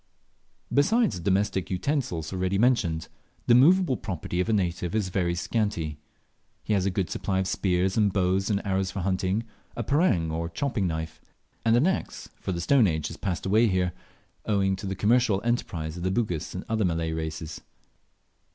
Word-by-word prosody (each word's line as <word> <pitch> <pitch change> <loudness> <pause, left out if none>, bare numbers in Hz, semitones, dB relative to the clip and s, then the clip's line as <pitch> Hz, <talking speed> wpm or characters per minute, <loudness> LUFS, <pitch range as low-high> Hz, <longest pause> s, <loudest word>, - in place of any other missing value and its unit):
Besides 215 - +3
the 85 - -8
domestic 95 -1 +1
utensils 95 - -2
already 95 +1 0
mentioned, 100 -9 +2 0.4
the 120 - +5
moveable 155 +2 +5
property 90 0 -4
of 90 - -2
a - - +2
native 90 -2 -1
is 105 -4 0
very 90 -2 0
scanty. 85 -6 -2 0.6
He 110 - -1
has 100 -2 +2
a - - +3
good 95 -1 -2
supply 95 -2 -1
of 95 0 0
spears 95 0 0
and 105 -2 +3
bows 95 +1 +1
and 100 -1 0
arrows 95 -1 0
for 95 +1 -4
hunting, 95 +3 0 0.3
a 120 - -2
parang, 110 - +2
or 85 +1 -2
chopping 105 +1 -1
knife, 80 -1 -4 0.4
and 115 0 +4
an 125 +6 +4
axe 190 +1 -2
for - - -4
the 85 -1 -3
stone 120 +5 +4
age 80 -3 -1
has - - -8
passed 90 -6 -3
away 110 +5 +4
here, 90 -3 0 0.5
owing 100 -2 +2
to 100 - -6
the 95 - -2
commercial 110 0 +3
enterprise 85 -10 -2
of - - -6
the 95 - 0
Bugis 95 -7 -2
and 90 - -5
other 110 -1 0
Malay 80 -2 0
races. 80 0 -5
95 Hz, 180 wpm, -26 LUFS, 85-110 Hz, 0.6 s, the